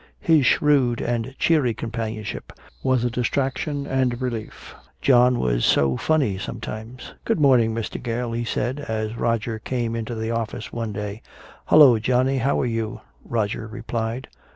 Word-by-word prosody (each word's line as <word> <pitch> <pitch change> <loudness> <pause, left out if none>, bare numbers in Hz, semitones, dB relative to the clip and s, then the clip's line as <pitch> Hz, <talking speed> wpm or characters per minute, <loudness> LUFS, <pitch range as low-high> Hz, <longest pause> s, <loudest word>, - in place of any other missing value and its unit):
His 155 -6 +4
shrewd 135 -5 +3
and 120 +2 -2
cheery 145 -9 +2
companionship 110 -1 -5 0.3
was 130 -2 +1
a 120 - 0
distraction 135 +4 -1
and 130 -3 0
relief. 120 -4 -5 0.3
John 125 -1 +4
was - - 0
so 70 -2 +3
funny 135 - +1
sometimes. 110 +5 -7
"Good 225 - 0
morning, 125 -6 +4
Mr. 115 -1 -4
Gale," 120 0 -2
he 120 +1 -2
said, 125 +4 -2
as 110 -5 -3
Roger 115 -1 -1
came 115 0 -2
into 115 +1 -4
the 110 +1 -3
office 115 -2 -4
one 115 -2 -3
day. 105 +1 -5 0.4
"Hello, 140 -7 +7
Johnny. 130 +3 +1
How 135 +3 +1
are - - 0
you?" 115 -2 -3 0.2
Roger 110 -1 -2
replied. 115 +2 -4
120 Hz, 150 wpm, -23 LUFS, 110-130 Hz, 0.4 s, Hello